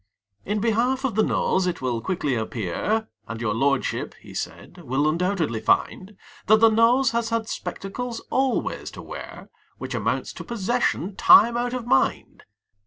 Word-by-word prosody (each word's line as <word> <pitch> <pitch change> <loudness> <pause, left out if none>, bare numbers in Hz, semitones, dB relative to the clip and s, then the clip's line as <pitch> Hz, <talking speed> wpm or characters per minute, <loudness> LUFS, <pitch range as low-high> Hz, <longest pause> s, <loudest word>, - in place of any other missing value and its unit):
In 210 +2 -1
behalf 235 +5 +1
of 260 - -1
the 220 - +2
Nose 190 -3 +1
it 180 -1 -2
will 125 -3 -2
quickly 160 -5 -1
appear, 120 - -2 0.2
And 115 - -6
your 110 -3 -1
lordship, 140 +4 0
he - - -13
said, - - -7
will 135 +4 0
undoubtedly 165 - 0
find, 190 - 0 0.3
That 215 - +7
the 225 0 +7
Nose 235 +3 +4
has 235 -1 -1
had 230 -1 -1
spectacles 230 +5 -5
always 265 -1 0
to - - -7
wear, - - -9 0.3
Which - - -6
amounts - - -2
to - - -8
possession 225 -3 -1
time 230 +4 +7
out 245 +1 -1
of 245 -2 -4
mind. 135 - 0
210 Hz, 160 wpm, -24 LUFS, 145-235 Hz, 0.3 s, That